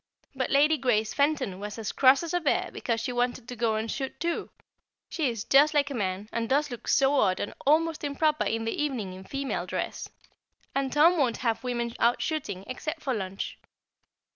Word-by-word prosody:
But 265 -2 -2
Lady 300 +2 +4
Grace 220 -4 +1
Fenton 280 -10 0
was 210 +2 -6
as 220 -2 -3
cross 270 +3 +5
as 335 - -4
a 355 - +2
bear 310 -5 0
because 230 -2 -1
she 250 - -2
wanted 245 0 -1
to 245 - -6
go 225 -1 +1
and 220 +1 -2
shoot 270 -1 -4
too. 340 0 -2 0.6
She 305 -6 0
is 230 -3 -4
just 295 +5 +5
like 285 -1 +2
a - - -2
man, 195 -3 -2
and 230 -1 -2
does 285 +1 +2
look 240 - -8
so 275 +1 +4
odd 190 -10 +2
and - - -3
almost 320 +2 +3
improper 300 +1 +1
in 225 0 -1
the 225 - -1
evening 245 -11 -2
in 190 +1 -10
female 275 +5 -3
dress. - - -4 0.6
And 270 -1 -1
Tom 330 +4 +5
won't 250 -5 +2
have 225 0 0
women 240 -2 -2
out 235 +1 +3
shooting, 210 - -3
except 310 +5 -5
for 265 - 0
lunch. 195 -3 -4
255 Hz, 200 wpm, -27 LUFS, 225-290 Hz, 0.6 s, cross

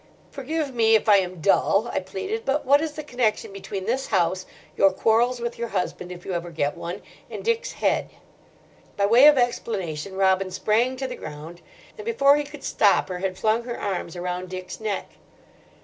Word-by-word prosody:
"Forgive 285 +1 -3
me 225 -2 +4
if 220 - +1
I 205 -2 +7
am 185 -3 -2
dull," 200 +4 +3
I - - +1
pleaded, 195 - -5
"but 280 +2 0
what 285 +3 +5
is 315 -2 -3
the 305 - -6
connection 240 -7 -1
between 195 -1 -6
this 255 +5 -1
house, 185 -2 0 0.3
your 195 -1 +5
quarrels 235 +5 +2
with 235 0 -4
your 235 - -2
husband 180 -3 -3
if 175 -1 -10
you 190 - -3
ever 175 0 -3
get 145 -3 -1
one, 175 +4 -6 0.3
and - - -7
Dick's 465 +2 0
head?" - - 0 0.9
By 200 - +3
way 240 +7 +7
of 300 -2 +7
explanation, 195 -8 -2
Robin 190 0 +2
sprang 230 +7 +1
to 265 +1 -3
the 255 - -6
ground, 160 +1 -9 0.4
and - - -6
before 285 -12 +4
he 295 - 0
could 290 -1 -11
stop 205 -3 +3
her 180 -1 -4
had 185 0 -3
flung 220 +3 +1
her 240 -1 -5
arms 185 -4 -3
around 180 +1 -4
Dick's 185 0 -7
neck. 215 -3 -2
210 Hz, 195 wpm, -24 LUFS, 185-255 Hz, 0.9 s, I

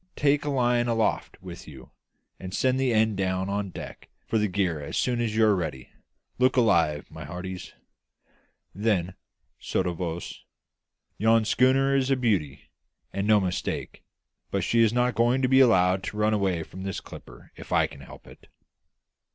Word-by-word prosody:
Take 145 0 +2
a - - -1
line 120 -3 +1
aloft 115 -2 -1
with 90 -2 -9
you, 65 -4 -13 0.5
and 95 0 -6
send 130 0 +1
the 130 -2 +1
end 110 -2 +2
down 95 0 -1
on 100 0 -2
deck - - -10 0.2
for 110 - 0
the 105 - +1
gear 90 -5 -1
as 70 - -5
soon 120 -1 0
as 110 -2 -2
you 110 0 +4
are 105 -2 +4
ready. 80 -8 -5 0.5
Look 130 +1 +3
alive, 85 -11 +2
my - - -9
hearties!" 90 +4 -7 1.0
Then, 95 -4 0 0.5
sotto 90 -2 -1
voce, 85 0 -5 0.8
"Yon 110 +1 +3
schooner 135 +4 +3
is 135 -1 +1
a 135 - +3
beauty, 95 - -1 0.4
and 100 +1 -2
no 110 -1 +5
mistake; 90 -2 -3 0.5
but 100 -2 -1
she 115 +5 +2
is 115 -2 +4
not 125 +1 +1
going 120 +3 +2
to - - +4
be 130 +1 +4
allowed 95 -7 +4
to 105 - -6
run 105 0 +2
away 95 -5 0
from 95 - -11
this 95 0 -4
clipper - - -13
if - - -12
I - - +4
can 70 -1 -10
help 65 - -13
it!" - - -16
105 Hz, 175 wpm, -26 LUFS, 90-120 Hz, 1.0 s, no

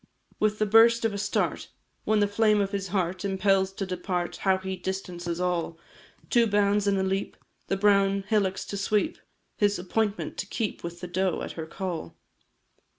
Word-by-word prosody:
With 215 0 +2
the 215 - +1
burst 230 +2 +5
of 225 - +1
a 200 - -3
start 195 - -1 0.4
When 215 -1 +3
the 205 - +4
flame 210 +1 +3
of 200 -1 0
his 200 -2 -2
heart 185 -1 -1
Impels 195 -1 +2
to 195 - -3
depart, 180 -1 -3
How 190 -1 +2
he 190 0 -4
distances 180 -2 -4
all! 175 -2 -1 0.5
Two 235 -2 +5
bounds 205 0 +2
at 200 - +3
a 190 - +1
leap, 195 +1 -2 0.3
The 195 - 0
brown 200 -1 +3
hillocks 200 -3 +1
to 200 - -3
sweep, 210 - 0 0.4
His 205 0 +2
appointment 205 +4 -2
to 205 - -3
keep 215 0 -3
With 170 0 -7
the 180 - -5
doe, 185 0 -1
at - - -5
her 160 -1 -6
call. 180 -1 -5
195 Hz, 180 wpm, -27 LUFS, 185-205 Hz, 0.5 s, burst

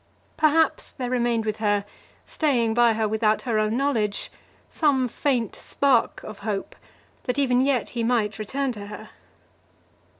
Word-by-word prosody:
Perhaps 315 +1 +2
there 250 -2 -4
remained 240 -2 +1
with 215 -1 -2
her, 205 -2 +1 0.4
staying 245 -8 +1
by 240 0 +4
her 220 0 0
without 215 0 +1
her 230 -4 0
own 215 +2 +1
knowledge, 230 -7 -1 0.4
some 275 -5 +1
faint 245 -3 -1
spark 270 -5 +1
of 215 - -9
hope, 200 -1 -4 0.5
that 250 - -1
even 255 -3 +3
yet 270 -3 +1
he 235 -2 -3
might 225 -3 0
return 265 +5 -2
to 205 -3 -8
her. 210 - -9
235 Hz, 145 wpm, -24 LUFS, 215-265 Hz, 0.5 s, by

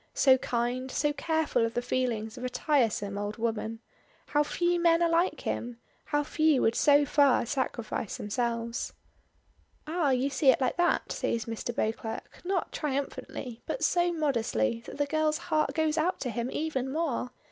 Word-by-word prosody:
So 260 -2 +5
kind, 245 +2 -1
so 295 +2 0
careful 315 -6 0
of 230 0 -1
the 245 - +1
feelings 235 -4 -1
of 250 - -8
a 255 - -1
tiresome 235 -7 0
old 205 +2 -4
woman. 225 0 -2 0.4
How 295 - +2
few 345 +4 +1
men 335 0 +4
are - - +4
like 335 +3 +1
him. 235 0 -3 0.3
How 295 0 0
few 310 -2 +2
would 225 - +3
so 290 +2 +5
far 280 -3 +4
sacrifice 235 -5 -3
themselves. 230 +2 -2 0.9
"Ah, 315 -1 0
you 265 +2 +1
see 270 0 +3
it - - +5
like 255 +3 0
that!" 350 0 +1
says, 230 -1 -1
Mr. 225 +1 -5
Beauclerk, 220 0 -3
not 370 -1 -1
triumphantly, 270 -4 -4
but - - -3
so 350 0 +3
modestly 225 - 0
that - - -8
the 290 - +1
girl's 310 +1 +1
heart 310 -1 0
goes 315 -1 +1
out 360 +4 0
to 250 - -2
him 235 +2 -2
even 270 -4 -2
more. 295 -5 -1
265 Hz, 170 wpm, -29 LUFS, 235-310 Hz, 0.9 s, So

